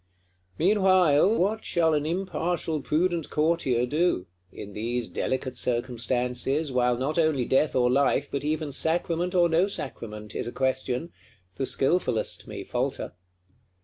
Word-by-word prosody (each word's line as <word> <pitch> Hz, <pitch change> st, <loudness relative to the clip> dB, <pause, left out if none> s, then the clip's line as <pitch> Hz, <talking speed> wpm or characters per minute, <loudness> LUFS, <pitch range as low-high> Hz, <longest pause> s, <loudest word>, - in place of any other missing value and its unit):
Meanwhile, 185 Hz, 0 st, +4 dB
what 215 Hz, +4 st, 0 dB
shall 165 Hz, -2 st, +2 dB
an 150 Hz, 0 st, 0 dB
impartial 170 Hz, -3 st, -2 dB
prudent 170 Hz, +2 st, 0 dB
Courtier 150 Hz, -6 st, +1 dB
do? 150 Hz, -, 0 dB, 0.3 s
In 100 Hz, 0 st, -9 dB
these 120 Hz, +3 st, -3 dB
delicate 130 Hz, -1 st, -2 dB
circumstances, 125 Hz, +4 st, -1 dB
while 125 Hz, -1 st, +2 dB
not 145 Hz, +6 st, -1 dB
only 155 Hz, -6 st, +2 dB
death 135 Hz, +5 st, +2 dB
or 125 Hz, -1 st, +3 dB
life, 140 Hz, +1 st, +2 dB
but 140 Hz, -, -2 dB
even 155 Hz, 0 st, -2 dB
sacrament 170 Hz, +4 st, 0 dB
or 175 Hz, -1 st, +5 dB
no 170 Hz, +3 st, +3 dB
sacrament, 115 Hz, -, -6 dB
is -, -, -3 dB
a -, -, -4 dB
question, 130 Hz, +4 st, -1 dB, 0.5 s
the 135 Hz, -, -1 dB
skilfulest 135 Hz, -1 st, 0 dB
may -, -, -6 dB
falter. -, -, -3 dB
150 Hz, 135 wpm, -26 LUFS, 125-170 Hz, 0.5 s, or